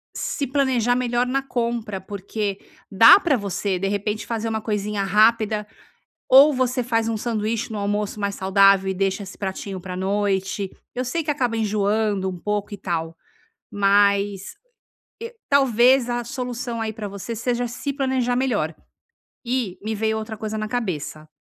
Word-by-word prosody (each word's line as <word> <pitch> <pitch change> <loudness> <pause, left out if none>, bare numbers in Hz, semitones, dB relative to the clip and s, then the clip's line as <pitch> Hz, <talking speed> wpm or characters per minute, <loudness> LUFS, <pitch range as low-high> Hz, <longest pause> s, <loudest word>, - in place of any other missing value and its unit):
se 280 - -2
planejar 255 -3 +1
melhor 245 -1 0
na 270 +2 0
compra, 235 -6 -3
porque 200 +1 -4 0.3
dá 230 - +8
pra 330 -8 +2
você, 200 -2 -2
de 195 - -1
repente, 205 +2 -2
fazer 230 -1 -3
uma 220 0 -2
coisinha 210 -1 -2
rápida 215 +1 +3 0.6
ou 280 +3 +8
você 255 -1 0
faz 225 -2 0
um 225 - -1
sanduíche 225 0 -2
no 215 - -4
almoço 205 +1 -2
mais 200 -1 -2
saudável 195 0 +4
e - - 0
deixa 195 +1 -1
esse 190 - -10
pratinho 195 0 -5
pra 180 0 -7
noite, 195 0 -1 0.2
eu 250 +1 -3
sei 320 +7 -2
que 300 - 0
acaba 250 -5 -1
enjoando 210 -2 0
um 185 - -6
pouco 205 +3 -3
e - - -6
tal, 165 -3 -3 0.6
mas, 200 0 +2 0.7
eh, 465 +1 -6 0.2
talvez 260 -2 +4
a 240 0 -1
solução 245 -1 -4
aí 220 -1 -2
pra 215 -1 -6
você 200 +4 -6
seja 245 +2 -1
se 260 +4 -4
planejar 260 -3 0
melhor. 215 -12 0 0.7
E, 235 -7 -2
me 220 +1 -2
veio 220 +1 0
outra 220 0 -6
coisa 215 +1 -4
na 215 0 -3
cabeça. 180 -9 -4
215 Hz, 165 wpm, -22 LUFS, 200-245 Hz, 0.7 s, dá